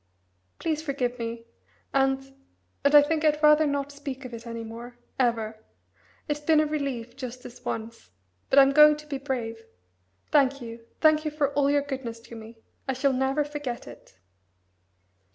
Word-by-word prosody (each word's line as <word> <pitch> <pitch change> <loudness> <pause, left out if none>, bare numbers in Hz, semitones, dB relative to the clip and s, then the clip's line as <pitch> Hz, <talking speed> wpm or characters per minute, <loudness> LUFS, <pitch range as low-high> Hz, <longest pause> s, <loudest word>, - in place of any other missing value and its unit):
Please 315 -2 -1
forgive 255 -5 -2
me 230 0 -5 0.5
and 270 0 +1 0.5
and 285 +1 +4
I 290 - +10
think 310 +1 -1
I'd 305 0 +2
rather 300 0 +6
not 285 0 -2
speak 280 -2 -7
of 250 - -8
it 230 +1 -8
any 230 0 -5
more 235 +2 -9 0.2
ever. 225 -3 0 0.7
It's 295 -1 -1
been 305 +1 +3
a 310 - +3
relief, 275 -6 -3
just 255 0 -7
this 245 - -12
once 225 - -5 0.4
but 270 - +2
I'm 275 0 +8
going 300 +1 +7
to 300 - -12
be 285 -2 -4
brave. 235 -5 -4 0.7
Thank 275 -2 +3
you, 230 -1 -9
thank 310 -1 +5
you 310 - -1
for 295 -2 -1
all 280 -1 +2
your 285 0 +2
goodness 260 -5 -5
to 235 - -12
me. 225 +1 -11 0.3
I 265 - 0
shall 265 +1 +1
never 265 +3 +1
forget 290 -4 -5
it." 120 -5 -14
270 Hz, 170 wpm, -26 LUFS, 235-295 Hz, 0.7 s, I